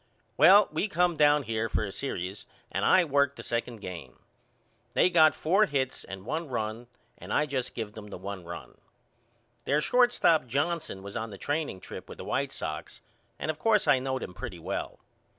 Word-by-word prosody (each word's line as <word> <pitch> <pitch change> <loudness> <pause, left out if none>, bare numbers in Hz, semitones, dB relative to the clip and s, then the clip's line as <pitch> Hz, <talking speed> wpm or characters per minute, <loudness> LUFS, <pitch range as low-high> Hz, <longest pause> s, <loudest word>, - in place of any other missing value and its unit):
Well 200 +1 +7
we 160 +7 0
come 180 -3 +2
down 150 -1 +4
here 115 -1 -2
for - - 0
a 100 - -5
serious 95 -5 -5 0.2
and - - -1
I 185 -2 +5
worked 140 -1 +2
the - - -9
second 115 -1 -3
game. 85 -10 -8 0.8
They 185 - +4
got 160 -3 +6
four 195 +7 +3
hits 135 -3 -2
and 95 0 -9
one 160 +6 -3
run, 115 0 -3 0.3
and - - -9
I 150 - +3
just 130 -4 -3
give 110 -3 -4
them 110 -2 -9
the 100 - -8
one 95 0 -6
run. 85 0 -9 0.9
Their 145 - +2
shortstop 240 - +3
Johnson 145 - -2
was 100 0 -8
on 115 -1 -3
the 100 - -9
training 145 - -2
trip - - -9
with - - -9
the - - -8
White 140 0 -1
Sox 75 -9 -6 0.4
and 155 - -1
of 155 - -12
course 215 0 +3
I 130 - +5
knowed 130 0 -2
him - - -7
pretty 110 -4 -7
well. 80 - -4
130 Hz, 190 wpm, -28 LUFS, 105-155 Hz, 0.9 s, Well